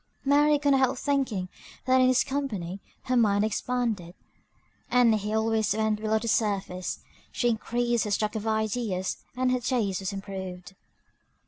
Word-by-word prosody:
Mary 295 +2 +4
could 285 0 +1
not 270 - +4
help 260 0 +2
thinking 260 -10 -1 0.4
that 260 0 +4
in 255 - +5
his 255 0 +4
company 205 -10 -3 0.2
her 255 - 0
mind 210 -3 +3
expanded, 220 -5 -2 0.7
as 235 -4 +4
he 210 +1 -3
always 220 -1 +1
went 220 -1 0
below 220 0 +1
the 225 +2 -4
surface. 200 -5 -1 0.3
She 240 - +1
increased 235 +1 0
her - - -3
stock 210 +2 0
of 220 0 -3
ideas, 220 -3 -1 0.2
and 255 0 +2
her 255 - +1
taste 230 -6 0
was 190 0 -3
improved. 190 -1 -7
220 Hz, 155 wpm, -27 LUFS, 200-250 Hz, 0.7 s, in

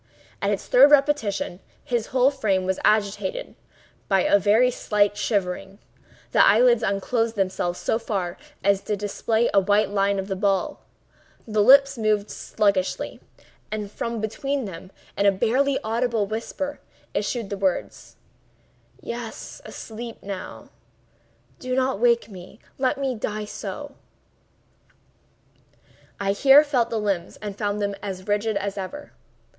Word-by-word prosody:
At - - +1
its - - -2
third - - +7
repetition, 275 -11 +2 0.2
his 240 -3 -1
whole 260 +1 +3
frame 200 -9 0
was 190 0 -1
agitated 215 - 0 0.5
by 195 -2 +3
a 200 - +4
very 220 +5 +4
slight 205 -3 +1
shivering; 195 -2 -2 0.5
the - - +5
eyelids 235 +2 +5
unclosed 225 +3 0
themselves 185 -3 -1
so 220 - 0
far 190 -6 -3 0.3
as 200 0 +3
to 210 0 -2
display 220 +3 0
a 200 - +6
white 205 +1 +2
line 200 0 +1
of 190 0 -3
the 195 - -2
ball; 195 0 0 0.7
the 215 -1 +1
lips 275 +3 +6
moved 215 -1 +1
sluggishly, 200 -4 -1 0.5
and 210 -2 -4
from 230 +1 -4
between 270 +5 -2
them, 185 0 -9 0.2
in 200 - +2
a - - +7
barely 265 +8 +1
audible 230 -1 0
whisper, 230 +7 -4 0.3
issued 210 +1 -2
the - - -1
words: 190 -2 -2 0.9
"Yes;—asleep 235 0 -8
now. 195 -2 -7 0.9
Do 255 0 -3
not 260 -4 0
wake 235 -2 +3
me!—let 220 +8 -5
me 270 -2 -1
die 215 -2 -4
so!" - - -7 2.3
I 200 -1 +1
here 270 +8 +7
felt 265 -6 0
the 230 - -2
limbs 195 -5 -2
and 205 -2 -6
found 205 0 -2
them 200 -1 -1
as 190 -1 -6
rigid 210 +1 0
as 200 0 -3
ever. 245 +11 -7
210 Hz, 135 wpm, -24 LUFS, 200-240 Hz, 2.3 s, third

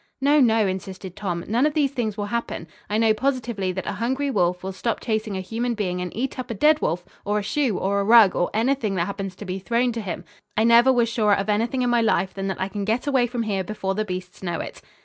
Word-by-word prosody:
"No, 285 +2 +4
no," 225 -4 +4
insisted 190 -1 -5
Tom. 175 -5 -3
"None 240 +7 +3
of 300 - -3
these 285 -4 +2
things 225 -6 -2
will 205 - -2
happen. 220 -6 -3 0.2
I 210 - 0
know 220 -1 +4
positively 235 -5 -1
that 190 - -4
a - - -2
hungry 265 +4 0
wolf 180 -5 +1
will 190 - -3
stop 225 +4 -2
chasing 215 -3 -2
a - - -3
human 235 +5 -2
being 180 -4 -2
and 180 -1 -4
eat 255 +4 -3
up 255 - -5
a 230 - -3
dead 300 +8 +4
wolf, 175 +3 -1 0.2
or 205 +1 0
a 210 - -1
shoe, 240 0 0
or 200 +1 0
a - - +1
rug, 220 -2 +7
or 175 - +1
anything 225 -2 0
that 170 -2 +1
happens 195 -1 -5
to 205 - -9
be 185 0 -4
thrown 240 +5 +1
to 230 0 -4
him. 180 -3 -5 0.3
I 220 - +4
never 235 +3 +6
was 240 -2 +3
surer 215 -3 +2
of 195 +2 -2
anything 230 +5 +1
in 245 - +1
my 240 -1 +3
life 205 -4 +1
than 195 0 -4
that 190 - -3
I 190 - 0
can 200 +1 -4
get 225 +6 0
away 265 -4 +2
from 240 -1 -2
here 200 -3 -1
before 195 -1 -3
the 215 +2 -1
beasts 185 -2 -6
know 175 -3 -3
it." - - -7
215 Hz, 265 wpm, -24 LUFS, 190-240 Hz, 0.3 s, rug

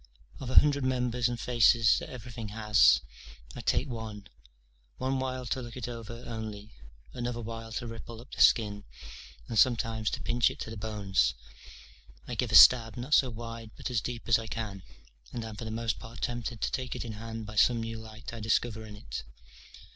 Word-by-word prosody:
Of 130 - -6
a - - -3
hundred 145 -2 +6
members 125 -2 +1
and 120 -1 -4
faces 115 -2 +4
that - - -8
everything 120 -2 -7
has, 105 - +4 0.5
I - - -6
take - - +1
one, 110 -4 -6 0.7
onewhile 130 -1 -2
to 130 - 0
look 120 0 -8
it 125 - -4
over 115 0 -7
only, 110 -2 -6 0.4
another 120 -1 -3
while 115 0 -6
to 120 - -3
ripple 115 0 -8
up 120 - -14
the - - -3
skin, 105 -3 +4 0.6
and 115 - 0
sometimes 115 -3 +2
to - - -4
pinch 120 0 +3
it - - -9
to 110 - -5
the - - -6
bones: 100 -3 0 0.9
I - - -4
give - - -1
a - - +3
stab, 115 -3 +8
not 130 +5 -3
so 135 -4 +5
wide 115 -1 -7
but - - -4
as 115 -3 +1
deep 120 -1 -6
as 115 -1 +5
I 115 - -7
can, 105 -4 -5 0.5
and 120 -2 -4
am 110 -1 -7
for 115 - -7
the - - -4
most 115 +1 -2
part 115 +1 -9
tempted 120 -2 -3
to 95 - 0
take 130 -1 -3
it - - -4
in 115 - -5
hand 115 +1 -6
by 105 +1 -9
some 120 +2 +4
new 115 0 -5
light 110 +1 -9
I 115 - -6
discover 110 0 0
in 105 - -10
it. - - -6
115 Hz, 200 wpm, -30 LUFS, 110-120 Hz, 0.9 s, stab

